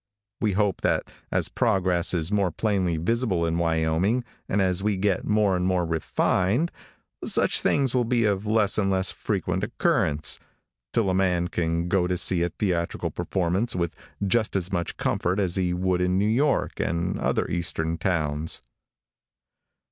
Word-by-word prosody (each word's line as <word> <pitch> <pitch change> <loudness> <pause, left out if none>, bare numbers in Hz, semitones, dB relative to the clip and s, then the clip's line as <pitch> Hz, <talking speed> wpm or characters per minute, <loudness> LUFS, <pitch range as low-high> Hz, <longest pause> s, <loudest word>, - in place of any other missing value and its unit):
We 105 -3 +1
hope 100 -2 0
that - - 0 0.2
as - - +1
progress 90 -2 +1
is 85 0 0
more 100 -3 +2
plainly 95 -4 0
visible 95 -1 +1
in 85 +1 0
Wyoming, 80 +8 +1 0.3
and 100 - +1
as 95 -1 +1
we 105 -1 0
get 95 -1 0
more 105 -3 +3
and 90 - -1
more 90 -2 +1
refined, 95 - 0 0.5
such - - +3
things 135 -4 +1
will 125 -1 +2
be 115 -1 +1
of 100 0 0
less 110 -1 +2
and 100 -2 +1
less 95 -1 +1
frequent - - -2
occurrence, 75 0 +1 0.5
till 105 -5 +1
a - - 0
man 90 -2 +1
can 85 0 -1
go 90 -1 +2
to 90 0 -1
see 90 0 +3
a 85 - +1
theatrical 85 -2 -2
performance 95 +5 -1
with 85 -2 -2 0.3
just 110 +2 +1
as 95 0 -1
much 85 -2 -2
comfort 90 +3 0
as 90 -3 +1
he 90 -2 +1
would 90 0 0
in 90 +1 +1
New 100 - +2
York 135 +6 +1
and 85 +1 -1
other - - 0
eastern 85 -1 -2
towns. 80 -4 -1
95 Hz, 165 wpm, -25 LUFS, 85-105 Hz, 0.5 s, more